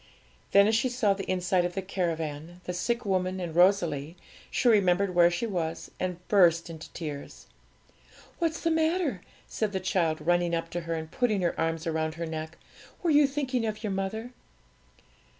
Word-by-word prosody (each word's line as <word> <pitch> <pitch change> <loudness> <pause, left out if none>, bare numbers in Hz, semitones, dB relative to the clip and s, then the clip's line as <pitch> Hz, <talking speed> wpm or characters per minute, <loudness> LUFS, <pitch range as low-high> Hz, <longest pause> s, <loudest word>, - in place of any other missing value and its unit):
Then, 200 0 +7
as 215 - +2
she 235 +3 +2
saw 240 -5 +2
the 195 0 -6
inside 180 0 +1
of 175 0 -3
the 195 - -1
caravan, 165 -3 -3
the 180 - -4
sick 235 +7 -1
woman, 185 -1 0
and 170 -3 -5
Rosalie, 175 -4 +2 0.3
she - - 0
remembered 195 -3 +4
where 175 -1 +6
she 175 +6 -2
was, 170 -6 -3
and 180 -1 -4
burst 170 -4 +4
into 160 -1 -10
tears. 150 -4 -7 0.9
'What's 330 -2 -1
the 330 - +1
matter?' 320 - +1 0.3
said 215 -2 -2
the 190 - 0
child, 175 -4 0
running 175 +2 +1
up 165 0 -4
to 175 - -3
her, 165 - 0
and 160 0 -6
putting 220 -6 +1
her 175 - +1
arms 165 0 -1
round 160 -1 -1
her 170 0 -4
neck; 160 +1 -6 0.5
'were 340 - +2
you 295 -1 +6
thinking 270 -3 -1
of 215 0 -3
your 210 - -1
mother?' 195 +5 -3
180 Hz, 180 wpm, -28 LUFS, 165-215 Hz, 0.9 s, Then